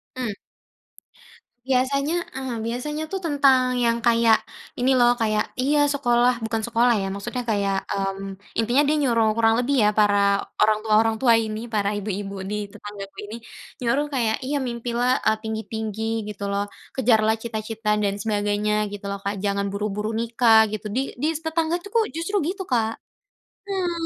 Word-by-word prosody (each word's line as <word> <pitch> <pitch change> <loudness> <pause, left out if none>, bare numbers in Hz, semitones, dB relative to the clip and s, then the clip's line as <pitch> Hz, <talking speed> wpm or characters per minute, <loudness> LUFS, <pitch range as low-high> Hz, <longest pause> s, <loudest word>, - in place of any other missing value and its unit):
Hmm. 250 -4 -2 1.4
Biasanya, 275 +4 +1 0.2
mmm, 260 -3 -4
biasanya 295 +7 -3
tuh 385 - -2
tentang 265 -4 +3
yang 230 0 +2
kayak 230 -1 +5 0.4
ini 255 +2 +3
loh 240 0 +6
kayak, 215 -1 +2 0.2
iya 285 +4 +2 0.2
sekolah 245 -3 +3
bukan 225 0 -1
sekolah 235 +1 +3
ya, - - -2
maksudnya 225 +5 -4
kayak, 200 -2 +1 0.2
mmm, 195 0 -3 0.2
intinya 240 +5 +3
dia 305 - +3
nyuruh, 230 -5 +3
kurang 225 -1 +4
lebih 260 +3 +1
ya 210 - +5
para 205 -1 +4 0.5
orang 215 0 +4
tua 220 -1 0
orang 225 0 +1
tua 240 -3 +5
ini, 215 0 -4
para 200 -2 +1
ibu-ibu 200 -1 -4
di 210 - -2 0.2
tetanggaku 200 -1 -9
ini, 220 - -6 0.5
nyuruh 270 +5 +1
kayak 230 -4 +1
iya, 290 - -1
mimpilah, 240 +1 -1 0.2
eee, 220 0 +3
tinggi-tinggi 220 -1 -4 0.3
gitu 205 -1 -7
loh. 200 0 0 0.3
Kejarlah 220 -3 +3
cita-cita 220 -1 -4
dan 200 -1 0
sebagainya 210 -1 0 0.2
gitu 205 -1 -8
loh 200 - -4
Kak, 200 +1 -2
jangan 200 0 0
buru-buru 210 +1 -2
nikah 230 -1 +4
gitu. 215 -1 -5
Di - - +2 0.2
di 300 - +2
s - - -3
tetanggaku 330 +2 -1
tuh 460 -1 +3
justru 335 +5 -3
gitu 380 +1 -3
Kak. 225 -2 +1 0.7
Hmm. 350 -4 -2
225 Hz, 160 wpm, -23 LUFS, 210-255 Hz, 1.4 s, loh